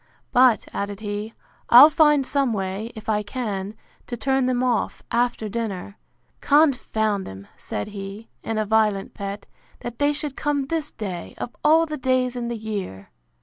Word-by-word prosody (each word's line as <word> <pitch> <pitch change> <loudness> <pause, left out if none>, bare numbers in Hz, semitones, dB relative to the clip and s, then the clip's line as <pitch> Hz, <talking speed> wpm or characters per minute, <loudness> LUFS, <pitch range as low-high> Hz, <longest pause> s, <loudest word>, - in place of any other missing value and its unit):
But, 250 -2 +4
added 200 +1 -4
he, 210 +1 -5 0.3
I'll 270 +6 +10
find 295 -3 +4
some 275 -3 +1
way, 195 +3 -3
if 220 - -10
I 210 -1 +1
can, 205 -3 -4 0.3
to 240 - -5
turn 265 +2 +1
them 250 0 +1
off, 245 -3 -1
after 240 -2 0
dinner.—Confound 220 - -1
them, 95 +1 -9
said 105 - -5
he, 200 +2 -8
in 225 - -3
a 215 - +1
violent 210 -2 +1
pet, 200 0 -6 0.4
that 240 -1 -7
they 290 0 +3
should 295 -2 -4
come 290 -2 -1
this 310 +1 -2
day, 185 -5 -6
of 240 - -6
all 320 +2 +5
the 305 -1 -5
days 255 -1 +1
in 240 -1 -3
the 235 -1 -3
year! 200 - -6
225 Hz, 160 wpm, -23 LUFS, 205-260 Hz, 0.4 s, I'll